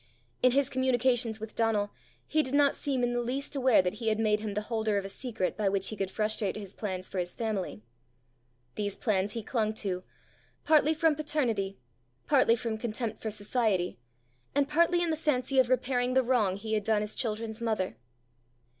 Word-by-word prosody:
In 255 -1 +5
his 275 0 +3
communications 250 -3 +1
with 220 0 -7
Donal, 215 -3 +1 0.3
he 310 - +2
did 270 -1 -2
not 285 -1 +4
seem 265 -3 -1
in 245 0 +1
the 240 - 0
least 265 +4 -3
aware 255 -7 +4
that 180 - -1
he 225 - -2
had 215 -1 +2
made 215 -1 +2
him 210 -2 -4
the 210 - 0
holder 220 -1 -1
of 195 - -2
a - - -5
secret 225 -4 -3
by 210 -2 +1
which 195 0 0
he 215 - -5
could 195 -2 -2
frustrate 215 0 -1
his 200 -2 -7
plans 185 -3 -4
for 190 - -4
his 175 0 -3
family. 210 - -3 0.9
These 205 -2 -2
plans 205 -2 0
he 230 - -4
clung 220 -2 -1
to, 185 -4 -3 0.6
partly 310 0 +4
from 320 0 +3
paternity, 245 -10 -1 0.5
partly 230 - +4
from 225 -1 -3
contempt 220 -1 -3
for 220 - -2
society, 205 - 0 0.6
and 285 -1 +3
partly 340 +3 +3
in 335 - +1
the - - +1
fancy 275 -4 +1
of 255 -2 +4
repairing 255 0 +1
the 260 - +5
wrong 230 -7 +2
he 220 +2 -4
had 210 -1 +1
done 215 0 +2
his 210 0 -3
children's 220 0 -3
mother. 220 -5 -1
225 Hz, 195 wpm, -29 LUFS, 210-255 Hz, 0.9 s, In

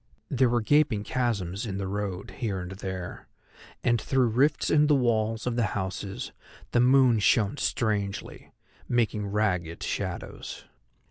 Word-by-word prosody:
There 130 -2 +3
were 120 0 +2
gaping 135 -4 +3
chasms 110 -4 -1
in 95 -2 -3
the 100 - -3
road, 100 -1 -4
here 105 -6 -1
and 90 +1 -6
there, 95 -2 -6 0.6
and 120 -2 +2
through 130 -3 +2
rifts 140 +7 +2
in 150 0 +5
the 150 - +5
walls 115 -3 +1
of 125 -1 -1
the 120 - +3
houses 95 +1 -4 0.4
the 120 - +3
moon 125 -2 +5
shone 105 +4 +3
strangely, 105 -7 -2 0.4
making 110 -4 +1
ragged 95 -5 -1
shadows. - - -5
110 Hz, 140 wpm, -27 LUFS, 100-125 Hz, 0.6 s, in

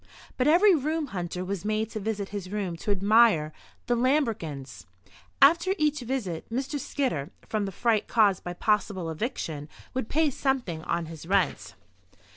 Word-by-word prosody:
But 255 - +1
every 365 +6 +6
room 310 +1 0
hunter 180 0 -3
was 195 -1 -4
made 215 +1 -1
to 215 - -4
visit 205 -1 -3
his 195 -3 -6
room 200 -5 -2
to 190 - -6
admire 200 -5 +4 0.3
the 245 - +1
lambrequins. 225 - -1 0.6
After 340 +6 +5
each 300 -2 +1
visit, 235 -10 -4
Mr. 275 +4 -2
Skidder, 245 - -2 0.2
from 215 -2 -1
the - - -4
fright 220 +2 +1
caused 205 -5 +3
by 175 - -4
possible 190 -3 0
eviction, 160 - -4 0.2
would 255 -3 -3
pay 310 -1 +2
something 245 - -1
on 170 -1 -1
his 160 0 -10
rent. 175 - 0
210 Hz, 155 wpm, -27 LUFS, 175-260 Hz, 0.6 s, every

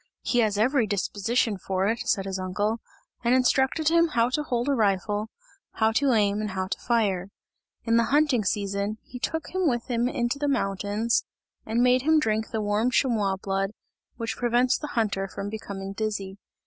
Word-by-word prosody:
He 245 - +1
has 215 -3 +2
every 240 +1 +2
disposition 205 +2 0
for 190 +1 -1
it!" 230 +2 0
said 195 - +1
his 190 -1 -3
uncle, 205 +5 -1 0.4
and 240 +1 +4
instructed 265 +4 +2
him 335 0 +4
how 240 -6 +2
to 300 - 0
hold 245 -3 -1
a 285 - +3
rifle, 210 -1 0 0.4
how 220 0 +2
to 270 +3 +2
aim 205 -1 +2
and 210 - -2
to 190 0 -3
fire. 200 -6 0 0.5
In 230 0 +2
the 230 - +3
hunting 285 -3 +2
season, 200 +1 -1
he 250 - -10
took 320 +5 -3
him 375 -2 +1
with 240 0 -2
him 240 +1 +1
in 240 -2 -1
the 290 - 0
mountains 210 -2 0 0.4
and 230 +2 +2
made 250 0 +4
him 315 +3 +4
drink 220 -6 0
the 220 - -2
warm 210 +4 +1
chamois 225 -7 +1
blood, 195 +1 -2 0.4
which 230 -1 -3
prevents 245 +1 +2
the 300 - -4
hunter 200 -3 0
from 200 +1 -6
becoming 195 -3 -6
dizzy. 200 -2 -3
220 Hz, 180 wpm, -26 LUFS, 200-250 Hz, 0.5 s, and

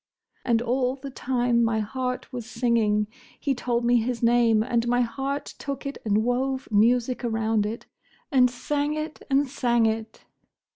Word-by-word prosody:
And 235 -1 +2
all 250 +1 0
the 275 0 -8
time 245 -2 +1
my 225 -1 +1
heart 250 +4 -3
was 240 -2 -5
singing!—He 235 +2 -1
told 240 -1 -1
me 240 0 +4
his 235 +1 -2
name; 230 -2 +4
and 235 0 0
my 245 +1 +3
heart 270 +4 -3
took 275 0 -5
it 275 - -5
and 215 0 +2
wove 260 +2 -1
music 240 +4 +2
around 220 -2 +1
it, 225 +2 -6 0.5
and 255 -3 +5
sang 290 +4 -2
it! 310 0 -5
and 275 +1 +3
sang 240 -3 +1
it!" 220 0 -3
245 Hz, 155 wpm, -25 LUFS, 230-260 Hz, 0.5 s, and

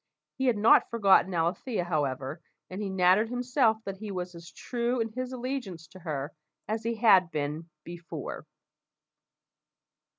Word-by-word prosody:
He 265 - -1
had 240 -4 +3
not 215 +2 +5
forgotten 195 -4 +4
Alethea, 175 +6 -1
however, 145 -2 -2 0.3
and 190 +3 -5
he 200 - -2
nattered 190 +4 +3
himself 245 -2 +2
that 195 -1 -5
he 215 +1 -7
was 180 -2 -4
as 170 -1 -11
true 240 +8 -2
in 225 0 0
his 255 +3 -5
allegiance 245 - -5
to 185 - -13
her 150 -3 -4 0.3
as 220 +2 -2
he 230 0 -1
had 200 -6 +5
been 155 +1 -4
before. 170 -3 -7
190 Hz, 145 wpm, -28 LUFS, 170-230 Hz, 0.3 s, not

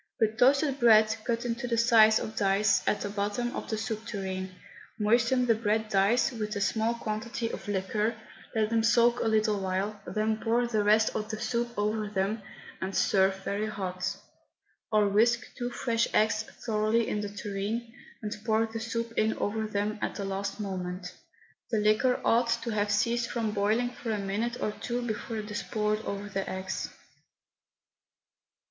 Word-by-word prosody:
Put 220 +1 +1
toasted 275 +2 +4
bread, 220 -2 +6
cut 235 0 -1
into 240 +1 -2
the 235 -1 0
size 225 -2 +6
of 220 - -4
dice, 195 -1 +3
at 205 - +1
the 205 - -3
bottom 210 +4 -2
of - - -5
the 220 - -1
soup 220 0 -3
tureen. 190 -2 -4 0.5
Moisten 235 +3 +3
the 235 - +4
bread 220 0 0
dice 205 +6 +3
with 215 -3 -4
a - - -1
small 220 +3 +1
quantity 230 +1 -3
of - - -7
the 205 - -1
liquor, 210 +4 0 0.4
let 215 0 +1
them 225 -1 +3
soak 235 +1 +4
a - - 0
little 215 -1 +2
while, 195 +2 -2
then 215 0 0
pour 235 +2 +1
the 220 -3 0
rest 215 +1 +3
of 215 -1 -3
the 215 -1 -4
soup 235 0 -2
over 210 +1 0
them, 205 +2 -1 0.4
and 190 +1 -3
serve 190 0 +2
very 205 +3 -1
hot. 185 -3 -3 0.7
Or 210 -1 +4
whisk 235 +4 +3
two 245 0 -3
fresh 230 -1 0
eggs 215 0 +3 0.2
thoroughly 220 0 +1
in 210 - -1
the 205 - -4
tureen, 205 +3 -4 0.3
and 210 +1 -3
pour 220 0 +2
the 225 0 -6
soup 230 0 -3
in 220 +1 +2
over 220 +1 -1
them 210 +1 -2
at - - -2
the 200 - -4
last 195 +1 -3
moment. 180 -2 -4 0.6
The 225 - +1
liquor 215 +5 +3
ought 235 +1 +3
to 235 - -2
have 210 -1 0
ceased 230 +3 +1
from 225 -3 -1
boiling 215 +4 +1
for 245 - -7
a 215 - 0
minute 210 +5 -2
or 215 - 0
two 240 +3 -4
before 225 +1 -4
it 210 0 -5
is 210 - -2
poured 215 0 -1
over 200 0 -4
the 195 -1 -3
eggs. 190 0 -4
215 Hz, 180 wpm, -29 LUFS, 205-230 Hz, 0.7 s, bread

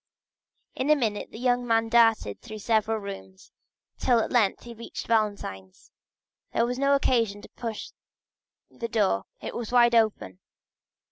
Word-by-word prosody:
In 265 +3 -2
a 305 - +7
minute 220 -7 -2
the - - -11
young 245 0 +1
man 225 0 +2
darted 225 - +3
through 215 - -9
several 220 +1 +1
rooms, 95 - -9 0.5
till 245 -2 +3
at - - -2
length 225 -6 +2
he 240 - -9
reached 230 +1 -8
Valentine's. 200 - -2 0.6
There 230 - +2
was 250 +1 -3
no 275 0 +4
occasion 230 -7 +1
to - - -12
push 225 -3 -6 0.8
the 230 - -5
door, 200 - +1 0.2
it - - -6
was 235 -2 -5
wide 240 -1 +5
open. 215 - +1
225 Hz, 150 wpm, -26 LUFS, 205-240 Hz, 0.8 s, a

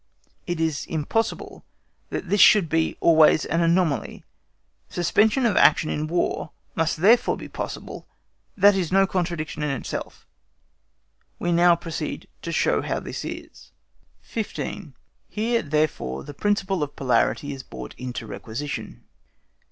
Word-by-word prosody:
It 175 -2 -2
is 160 -3 -1
impossible 165 +9 -2 0.5
that - - -4
this 200 +3 +3
should 195 -7 +7
be 160 +1 0
always 160 -2 +5
an 165 +2 0
anomaly; 170 -3 +1 0.7
suspension 215 - +2
of 225 - +2
action 155 - +4
in 155 +1 -2
War 170 0 -1 0.2
must 165 0 0
therefore 215 +9 +4
be - - -8
possible, - - -7 0.5
that 200 +1 +7
is 185 -4 -1
no 195 +1 +5
contradiction 170 -5 -3
in 150 - 0
itself. 135 -3 -5 1.1
We 175 - -1
now 170 0 +5
proceed 165 -1 -5
to - - -5
show - - +2
how - - -2
this - - -6
is. - - -9 0.5
15. 220 -3 -5 0.3
HERE, 230 +2 0
THEREFORE, 150 - -1
THE 145 - -9
PRINCIPLE 195 +1 0
OF 145 -1 -3
POLARITY 140 +2 +1
IS 135 - -7
BROUGHT 65 - -9
INTO 125 -1 -5
REQUISITION. 120 +6 -6
165 Hz, 135 wpm, -24 LUFS, 150-195 Hz, 1.1 s, should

